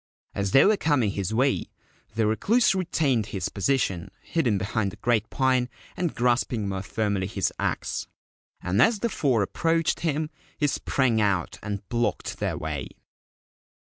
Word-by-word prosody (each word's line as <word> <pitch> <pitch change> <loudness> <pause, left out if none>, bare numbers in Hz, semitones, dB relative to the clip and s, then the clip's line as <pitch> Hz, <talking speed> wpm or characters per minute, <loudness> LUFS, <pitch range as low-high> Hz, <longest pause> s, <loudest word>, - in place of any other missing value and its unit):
As 100 -1 -1
they 135 - +6
were 210 0 +4
coming 130 - +2
his 100 0 -3
way 130 +5 +1 0.5
the 110 -1 +2
Recluse 210 - +3
retained 150 - +1
his 95 -4 -3
position, 100 -5 0
hidden 125 -11 +1
behind 100 +2 -1
the - - -11
great 115 -3 0
pine, 130 -2 +1 0.3
and 175 -3 -2
grasping 120 -3 +1
more 95 -1 -2
firmly 100 -2 -1
his 100 -2 -1
axe; - - -2 0.6
and 90 +3 +2
as 225 -1 +5
the 235 - +1
four 130 - +1
approached 165 - 0
him 155 -1 -1 0.3
he 150 - +1
sprang 130 -4 +1
out 100 -5 0
and 100 -2 -5
blocked 120 0 -1
their - - -1
way. 75 -4 -4
115 Hz, 150 wpm, -26 LUFS, 100-145 Hz, 0.6 s, they